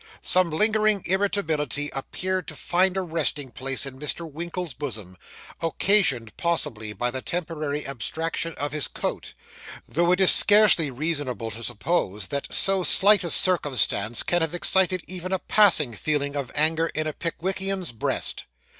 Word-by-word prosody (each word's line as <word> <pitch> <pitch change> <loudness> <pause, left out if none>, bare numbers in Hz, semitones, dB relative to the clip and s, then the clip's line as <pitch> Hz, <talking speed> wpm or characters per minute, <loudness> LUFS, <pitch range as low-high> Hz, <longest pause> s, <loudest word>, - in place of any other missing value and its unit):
Some 185 -1 +3
lingering 215 +3 +3
irritability 165 -7 -1
appeared 185 +6 -3
to - - -8
find 185 +2 0
a - - 0
resting 155 -6 -2
place 135 +2 -2
in 130 -1 -9
Mr. 155 +3 -3
Winkle's 170 +1 -6
bosom, 110 -10 -7 0.5
occasioned 165 - +2
possibly 115 -11 -1
by 120 +4 -2
the 130 +1 -5
temporary 155 -4 -3
abstraction 160 +5 -3
of 145 0 -4
his 150 -1 -1
coat - - -5 0.5
though 175 +2 +1
it 180 - +2
is 190 - +6
scarcely 205 -7 +5
reasonable 130 -4 -2
to 115 +2 -9
suppose 105 - -2
that 140 0 -3
so 195 -1 +2
slight 205 +3 +4
a 170 - -3
circumstance 130 - +2
can 175 0 0
have 160 +1 -1
excited 185 0 +2
even 185 0 -6
a 190 - +1
passing 175 - +3
feeling 145 +3 -2
of 140 -3 -4
anger 160 +2 +2
in 155 +1 -1
a 155 - -3
Pickwickian's 190 +1 -3
breast. 115 - -1
160 Hz, 150 wpm, -24 LUFS, 135-185 Hz, 0.5 s, is